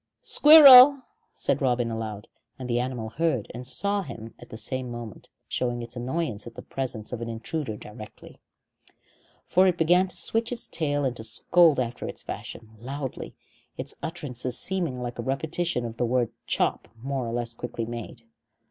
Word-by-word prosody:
"Squirrel!" 280 -3 +9 0.3
said - - +1
Robin 120 -3 +1
aloud, 110 -2 -5 0.3
and 130 - -7
the 120 -1 0
animal 125 -3 -3
heard 135 -2 -1
and 125 +1 -7
saw 200 +11 -1
him 115 - -9
at 120 - -14
the 110 - -8
same 130 +1 -4
moment, 120 -3 -9 0.2
showing 120 -1 -2
its 120 +1 -10
annoyance 120 -3 -3
at - - -11
the - - -9
presence 125 -5 -4
of 120 - -5
an 115 - -4
intruder 115 +1 -4
directly. 105 +1 -12 1.1
For 185 +1 +4
it 180 -2 +1
began 175 +3 +3
to 180 - -6
switch 225 +7 0
its 240 - -4
tail 145 -3 -1
and 125 -2 -1
scold 155 +8 +3
after 120 -1 -3
its - - -7
fashion, 110 -1 -8
loudly, 135 +2 -6 0.4
its - - -5
utterances 130 -7 -3
seeming 175 -9 -2
like 120 -1 -6
a - - 0
repetition 145 +2 -2
of 115 -1 -7
the 120 - 0
word 120 -1 0 0.2
"chop" - - 0 0.2
more 135 -2 -3
or - - -4
less 120 0 -3
quickly 115 -1 -5
made. 115 0 -8
125 Hz, 170 wpm, -26 LUFS, 115-165 Hz, 1.1 s, Squirrel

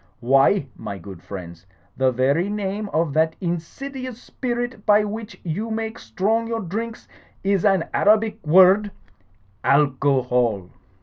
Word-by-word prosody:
Why, 135 +7 +3
my 100 - -6
good 95 -1 -11
friends, 90 -2 -9 0.3
the 130 -1 +2
very 140 +9 +1
name 205 0 -3
of 160 -4 0
that 160 +1 +2
insidious 245 - -5
spirit 245 -3 -4
by 210 0 +4
which 210 -1 -6
you 195 +7 -3
make 220 +1 -4
strong 210 - -1
your 230 -1 -2
drinks 220 +5 -5 0.4
is 195 -2 +1
an 195 -4 +3
Arabic 215 +1 +2
word: 190 +6 +6 0.7
alcohol. 130 -8 +2
190 Hz, 125 wpm, -22 LUFS, 135-220 Hz, 0.7 s, word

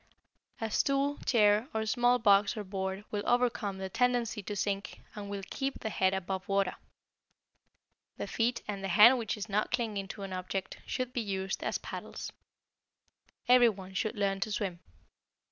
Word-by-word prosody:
A 225 -2 -3
stool, 275 +3 +1
chair, 210 -1 +4
or 220 0 0
small 245 +2 +3
box 205 -2 +4
or 210 - -3
board 190 +1 -4
will 205 - -1
overcome 240 -5 +1
the 190 0 -4
tendency 235 0 +1
to 205 +1 -5
sink 200 0 -2
and 205 -1 -7
will 200 -1 -4
keep 270 0 -2
the 220 - -4
head 190 -2 +2
above 190 0 -3
water. 195 -2 +1 1.4
The - - -3
feet, 235 +1 0
and 200 -2 -4
the - - -1
hand 215 +8 +7
which 225 -2 -2
is 210 - -5
not 210 0 0
clinging 220 -5 -1
to 200 +1 -7
an 195 -1 -5
object, 185 +1 -4
should 255 -1 -2
be 245 - 0
used 190 -2 -3
as - - 0
paddles. - - -7 1.2
Every 245 -1 +7
one 190 -3 -8
should 215 +4 -1
learn 200 -2 0
to 215 - -2
swim. 195 -5 -2
210 Hz, 170 wpm, -31 LUFS, 195-235 Hz, 1.4 s, hand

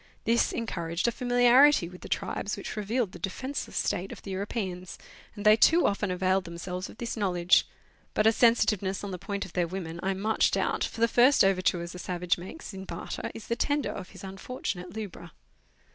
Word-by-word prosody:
This 235 +1 +2
encouraged 170 -5 -2
a - - +3
familiarity 245 -1 +5
with 180 +1 -12
the - - -9
tribes, 205 - -2
which - - -6
revealed 215 0 -1
the 175 - -11
defenceless 260 - -4
state 185 +2 -1
of - - -10
the 195 - -6
European, 190 -2 -3 0.5
and 205 -1 -7
they 215 0 +8
too 330 +10 +5
often 205 0 0
availed 185 +1 +1
themselves 180 +2 -5
of - - -13
this 235 0 -4
knowledge; 180 -4 +3 0.5
but 215 - +2
a 220 - +7
sensitive 225 -3 +3
ness 190 0 -3
on 200 - -4
the 180 - -5
point 200 +2 -4
of 185 - -13
their 175 -2 +1
women 170 -2 -5
I 190 0 0
much 215 +3 +2
doubt, - - 0
for 225 - -4
the 230 - +6
first 250 +4 +5
overtures 185 -2 +1
a 180 - -8
savage 180 -1 -1
makes 195 - -9
in 190 0 -7
barter 170 -2 -5
is 225 - -8
the 235 - -1
tender 290 +3 0
of 185 - -7
his - - -13
unfortunate 190 -2 -5
lubra. 180 -6 -7
195 Hz, 200 wpm, -28 LUFS, 180-230 Hz, 0.5 s, they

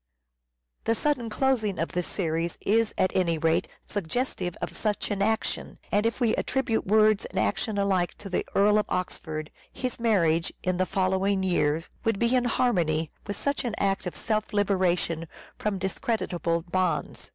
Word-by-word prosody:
The 230 - +2
sudden 255 -4 0
closing 220 -5 +1
of 165 - -1
the 180 - 0
series 165 -2 -2
is 225 +1 +2
at 185 - +1
any 170 -3 +2
rate 160 +1 +2 0.2
suggestive 195 -2 -2
of - - -4
such 210 -1 -1
an 200 -1 -1
action, 220 +2 -1
and 210 +2 +3
if 230 - -2
we 230 -3 +3
attribute 240 -6 0
words 215 0 +4
and - - -7
action 110 - 0
alike 190 -3 +1
to 205 - -9
the 185 - 0
Earl 210 +1 +5
of 210 - -1
Oxford, 155 -4 -3 0.2
his 255 -2 -4
marriage, 170 -8 +2
in 185 -1 0
the 185 0 +1
following 190 +1 +1
year, 160 -4 +1 0.2
would 225 -2 +1
be 235 +4 +2
in 250 -1 +2
harmony 170 -11 +1 0.2
with 205 - -2
such 280 0 -1
an 235 -3 -2
act 195 -1 0
of 180 - -5
self 215 -1 -1
liberation 180 -5 +1 0.3
from 210 -2 -1
discreditable 185 -4 -1
bonds. 180 0 -1
195 Hz, 165 wpm, -27 LUFS, 175-220 Hz, 0.3 s, Earl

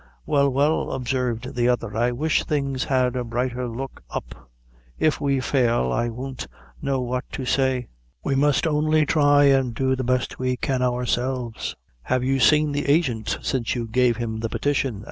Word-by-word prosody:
"Well, 140 -1 +3
well," 145 +4 +1
observed 125 -2 -2
the 120 0 +1
other, 115 -4 -1
"I 120 +2 +2
wish 150 +5 +1
things 140 -3 -1
had 130 -2 +1
a 125 - -1
brighter 125 +1 -2
look 130 +3 -6
up. 60 0 -7 0.5
If 155 -1 +1
we 140 -1 +1
fail, 120 - +1
I 120 - 0
won't 130 +2 -6 0.3
know 135 -1 0
what 125 +1 -2
to 130 - -4
say. 130 -1 +1 0.4
We 140 - 0
must 145 +2 +2
only 155 0 +2
thry 145 -1 +4
an' 135 -3 +2
do 130 +2 +1
the 130 - -3
best 125 0 -1
we 130 0 0
can, 130 0 -1
ourselves." 125 -1 -1 0.3
"Have 130 - 0
you 135 +1 +1
seen 150 +4 +4
the 145 0 -2
agint 140 -8 +1
since 125 -4 -1
you 120 -2 -2
gave 120 0 +2
him 110 -2 -3
the 115 0 -2
petition?" 135 -6 -1
130 Hz, 175 wpm, -23 LUFS, 120-140 Hz, 0.5 s, thry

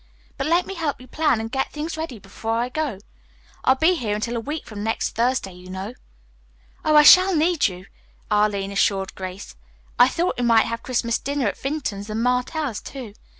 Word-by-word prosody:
But 275 - -2
let 340 +3 +3
me 390 - -6
help 320 -6 -2
you 255 - -12
plan 300 -7 +1
and 225 0 -5
get 265 0 -1
things 310 +2 -4
ready 315 -6 -5
before 220 +3 -4
I 240 +2 -1
go. 285 -5 -2 0.7
I'll 260 - +5
be 320 +7 +4
here 225 -11 -2
until 230 +3 -3
a - - -1
week 295 +7 -5
from 205 -2 -7
next 225 +1 -1
Thursday, 235 -4 0
you 180 +1 -13
know." 190 +5 -5 0.9
"Oh, 310 - +3
I 300 - +9
shall 370 +4 +8
need 325 -2 +3
you," 185 -1 -8 0.5
Arline 205 -2 +1
assured 195 -1 +1
Grace. 185 +1 -7 0.4
"I 245 - +8
thought 335 +2 -1
we - - 0
might 230 -2 +5
have 230 0 -4
Christmas 235 -2 -1
dinner 280 -1 -2
at 200 - -2
Vinton's 255 -8 -3
and 220 +2 -2
Martell's, 250 - -1
too. 250 -7 -8
245 Hz, 195 wpm, -23 LUFS, 210-300 Hz, 0.9 s, I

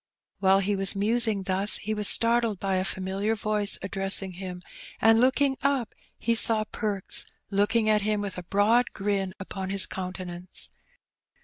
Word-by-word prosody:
While 195 0 +3
he 200 +1 -1
was 195 0 +1
musing 215 0 0
thus 190 +2 +2
he 215 +1 -4
was 210 -1 +1
startled 230 -3 +3
by 195 0 -1
a 185 - 0
familiar 195 +3 -2
voice 210 -1 +1
addressing 195 0 +1
him, 180 0 -8 0.4
and 225 +1 +4
looking 265 +1 +1
up 275 -4 -1 0.2
he 235 - -1
saw 225 -1 +5
Perks 210 -3 +1 0.2
looking 215 +3 +1
at 215 -1 +2
him, 210 0 -1
with 200 -3 -5
a - - -9
broad 210 +7 +1
grin 195 -2 -3
upon 190 0 -6
his 195 0 +2
countenance. 180 -1 -5
200 Hz, 155 wpm, -26 LUFS, 190-220 Hz, 0.4 s, saw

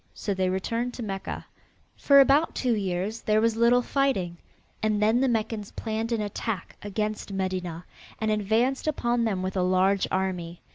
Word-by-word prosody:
So 205 - -2
they 185 -1 0
returned 230 +6 -2
to 245 - -5
Mecca. 195 -2 -5 0.5
For 280 -1 +5
about 280 +4 +4
two 250 -2 +1
years 195 +1 -2
there 215 0 +2
was 225 0 +2
little 235 +2 +4
fighting, 240 -13 0 0.4
and 215 -1 +1
then 220 +3 +3
the 270 - +3
Meccans 220 -3 -1
planned 225 +1 -3
an 230 -2 0
attack 205 -2 -4
against 210 0 -3
Medinah, 185 -3 -3 0.4
and 220 -1 0
advanced 225 +7 +1
upon 240 -5 +1
it 210 - 0
with 185 +1 -3
a 185 - +1
large 185 +2 +2
army. 180 -3 -2
215 Hz, 165 wpm, -26 LUFS, 190-235 Hz, 0.5 s, For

